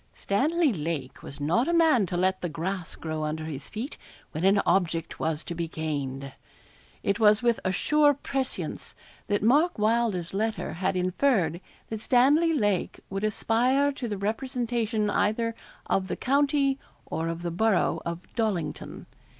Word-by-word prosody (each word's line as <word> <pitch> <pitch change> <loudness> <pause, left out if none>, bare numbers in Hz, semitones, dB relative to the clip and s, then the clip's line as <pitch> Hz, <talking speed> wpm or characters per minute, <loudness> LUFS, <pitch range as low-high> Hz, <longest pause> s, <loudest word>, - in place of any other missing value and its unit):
Stanley 300 +7 +1
Lake 155 -6 -4
was 140 - -9
not 170 - +1
a 340 - +1
man 315 - +4
to 175 - -2
let 185 +1 +1
the 175 - -2
grass 175 +3 -4
grow 155 -1 -4
under 155 +1 -3
his 145 -3 -6
feet 235 +8 -6 0.3
when 155 - -4
an 195 +2 +5
object 170 -2 0
was 160 -1 -1
to - - -5
be 170 0 -3
gained. 140 -4 -4 0.7
It 200 +2 0
was 215 0 +5
with 235 -1 +2
a 185 - +1
sure 290 +9 +3
prescience 270 -1 -4 0.3
that 205 -1 0
Mark 295 +10 +4
Wylder's 215 -5 +1
letter 220 +2 -1
had 190 +3 -1
inferred 185 - +1 0.3
that 220 -1 -4
Stanley 285 +8 +4
Lake 205 - 0
would 195 +1 -3
aspire 250 +6 +2
to 265 -3 -5
the 205 -2 -3
representation 225 0 -1
either 230 +3 +1 0.3
of 190 -1 0
the - - -2
county 280 0 +2 0.3
or 160 +1 -3
of 165 +1 -4
the 170 - -2
borough 215 +3 +2
of 170 0 -4
Dollington. 205 -9 -2
205 Hz, 160 wpm, -27 LUFS, 170-245 Hz, 0.7 s, an